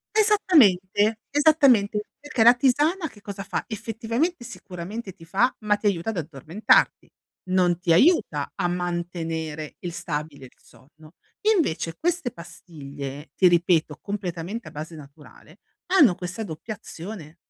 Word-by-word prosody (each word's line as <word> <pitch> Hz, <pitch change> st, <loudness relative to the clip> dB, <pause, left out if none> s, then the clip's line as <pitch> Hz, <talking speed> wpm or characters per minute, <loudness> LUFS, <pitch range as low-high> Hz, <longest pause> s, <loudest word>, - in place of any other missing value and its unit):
Esattamente, 225 Hz, -, +4 dB
esattamente 275 Hz, -9 st, +4 dB, 0.2 s
perché, 285 Hz, -5 st, 0 dB
la 235 Hz, -, +9 dB
tisana 295 Hz, +8 st, +2 dB
che 215 Hz, -7 st, -16 dB
cosa 200 Hz, -1 st, -7 dB
fa? -, -, -3 dB
Effettivamente 230 Hz, -, -2 dB
sicuramente 200 Hz, -2 st, -8 dB
ti 170 Hz, -, -17 dB
fa, 215 Hz, +9 st, +1 dB
ma 210 Hz, -1 st, +1 dB
ti 210 Hz, -, -12 dB
aiuta 195 Hz, -1 st, +1 dB
ad 220 Hz, -, -3 dB
addormentarti. 160 Hz, -, +1 dB, 0.4 s
Non 180 Hz, -2 st, +2 dB
ti 175 Hz, -2 st, +2 dB
aiuta 190 Hz, -, +3 dB
a 185 Hz, -3 st, 0 dB
mantenere 170 Hz, -3 st, -4 dB
il 175 Hz, -2 st, -6 dB
stabile 150 Hz, -5 st, -5 dB
il 125 Hz, -, -15 dB
sonno. 155 Hz, +3 st, -20 dB, 0.4 s
Invece 165 Hz, -, -1 dB
queste 340 Hz, -7 st, -1 dB
pastiglie, 145 Hz, -4 st, -9 dB
ti 185 Hz, -, +5 dB
ripeto 170 Hz, -3 st, +2 dB
completamente 195 Hz, +1 st, -5 dB
a -, -, -9 dB
base 155 Hz, +3 st, -7 dB
naturale, 150 Hz, 0 st, -15 dB, 0.3 s
hanno 270 Hz, -, +6 dB
questa 185 Hz, +5 st, -5 dB
doppia 195 Hz, +5 st, -6 dB
azione. 175 Hz, -5 st, -9 dB
185 Hz, 135 wpm, -24 LUFS, 165-230 Hz, 0.4 s, la